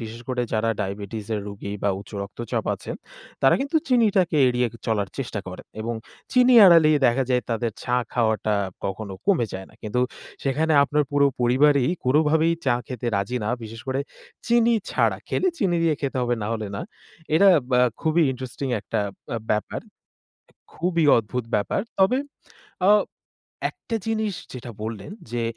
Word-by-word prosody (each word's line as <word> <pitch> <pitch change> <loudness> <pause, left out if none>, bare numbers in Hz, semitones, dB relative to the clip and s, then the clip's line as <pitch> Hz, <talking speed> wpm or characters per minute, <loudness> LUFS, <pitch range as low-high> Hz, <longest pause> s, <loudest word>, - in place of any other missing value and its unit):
বিশেষ 115 +1 -7
করে 125 -1 0
যারা 115 +1 +1
ডায়াবেটিসের 105 +2 -4
রোগী 100 0 -6
বা 100 - +2
উচ্চ - - -14
রক্তচাপ 105 +3 -4
আছে। - - -9 0.5
তারা 135 - +6
কিন্তু 280 +4 0
চিনিটাকে 200 -9 +3
এড়িয়ে 125 0 +1 0.2
চলার 105 -4 0
চেষ্টা 115 -6 -3
করে। 90 - -8 0.2
এবং 115 +1 -3 0.4
চিনি 250 0 +5
এড়ালেই 160 -4 +7
দেখা 130 +3 +2
যায় 125 -1 +2
তাদের 115 -1 -1
চা 125 0 +1 0.2
খাওয়াটা 110 -2 +1 0.3
কখনো 100 +1 -4
কমে 180 - +3
যায় 95 0 -6
না। - - -21
কিন্তু 115 +4 -1 0.4
সেখানে 155 +4 +1
আপনার 150 +1 +1
পুরো 145 0 +4
পরিবারই 130 +2 +4 0.2
কোনোভাবেই 155 +4 +3
চা 120 - +4
খেতে 125 -3 -5
রাজি 100 +6 -1
না। - - -1
বিশেষ 110 0 -8
করে 130 +1 0 0.5
চিনি 235 0 +4 0.2
ছাড়া - - +1
খেলে 375 - +1
চিনি 180 -4 +1
দিয়ে 160 -2 +3
খেতে 135 -2 -2
হবে 120 0 +1
নাহলে 110 0 -3
না। - - -4 0.5
এটা 195 +5 +6 0.2
ব্য - - +2 0.3
খুবই 160 +1 +2
ইন্টারেস্টিং 130 +1 -5
একটা 105 - -2 0.3
আ - - 0
ব্যাপার। 105 - -1 0.7
এ - - -33 0.2
খুবই 170 -1 0
অদ্ভুত 115 +2 -2
ব্যাপার। 105 - 0 0.2
তবে 195 +7 +4 0.7
আ - - +7 0.8
একটা 230 - -6
জিনিস 220 -2 0 0.2
যেটা 125 -1 -7
বললেন 110 - -5 0.2
যে 120 -1 -1
125 Hz, 155 wpm, -24 LUFS, 110-160 Hz, 0.8 s, এড়ালেই